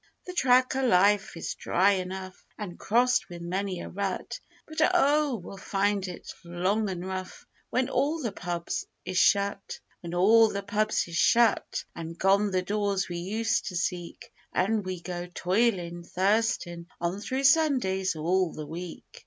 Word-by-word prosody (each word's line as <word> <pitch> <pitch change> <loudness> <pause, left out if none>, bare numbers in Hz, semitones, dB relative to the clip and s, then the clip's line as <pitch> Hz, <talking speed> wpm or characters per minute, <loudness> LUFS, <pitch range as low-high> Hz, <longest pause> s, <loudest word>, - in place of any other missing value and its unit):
The 360 - -6
track 255 -5 +3
o' 265 - 0
life 205 -4 +3
is - - -4
dry 190 +3 +2
enough, 185 0 -4
an' 200 -5 -6
crossed 245 +3 +2
with 170 -1 -8
many 185 +1 -2
a - - -6
rut, 195 -1 -4 0.3
But, 315 - -4
oh! 295 -4 +3
we'll 195 -1 -9
find 200 0 0
it 180 - -9 0.2
long 185 +5 0
an' 180 -2 -4
rough 185 0 -6 0.2
when 255 0 +1
all 280 +5 0
the 235 -8 -2
pubs 175 -3 -3 0.2
is 185 - 0
shut; 200 0 +2 0.2
When 170 0 -6
all 220 +5 +6
the 200 -1 -4
pubs 210 +1 0
is 170 -1 -4
shut, 235 +5 +3
an' 165 0 -6
gone 195 +4 +3
the 185 -1 0
doors 200 0 0
we 175 - -4
used 220 +6 -1
to 185 - -5
seek, 175 0 -4 0.2
An' 210 +4 +1
we 185 -2 -5
go 175 -1 -5
toilin', 180 -1 0
thirstin' 185 -2 0
on 175 +3 -2
through 260 +5 -2
Sundays 255 - +3
all 175 +3 +1
the 155 - -6
week. 170 +3 -7
195 Hz, 160 wpm, -28 LUFS, 175-220 Hz, 0.3 s, all